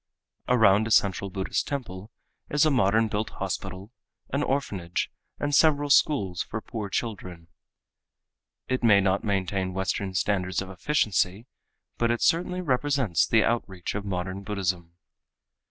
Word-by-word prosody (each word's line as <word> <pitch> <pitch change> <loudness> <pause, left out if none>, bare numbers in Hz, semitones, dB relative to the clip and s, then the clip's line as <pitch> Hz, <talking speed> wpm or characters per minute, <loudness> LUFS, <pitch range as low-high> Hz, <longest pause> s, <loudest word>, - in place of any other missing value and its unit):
Around 110 -3 +5
a - - -4
central 100 -2 +2
Buddhist 95 0 -2
temple 110 -8 -5 0.4
is 150 +1 +3
a 155 - +3
modern 110 -3 +3
built 105 +1 -2
hospital, 95 +4 -5 0.4
an 140 - +1
orphanage 100 -12 -2 0.3
and 145 0 -2
several 145 -1 +4
schools 100 - +3
for 115 - -4
poor 110 -1 -6
children. 90 -7 -5 1.2
It 130 -1 -1
may 105 -4 +6
not 95 0 +1
maintain 95 -2 -1
western 95 0 -2
standards 95 -1 0
of 95 0 -5
efficiency, 100 - 0 0.5
but 115 - +2
it 120 0 0
certainly 180 +2 +1
represents 135 - +1
the 110 -1 +4
outreach 95 -7 -2
of 105 - -3
modern 95 0 -4
Buddhism. 90 -4 -3
100 Hz, 135 wpm, -26 LUFS, 95-125 Hz, 1.2 s, may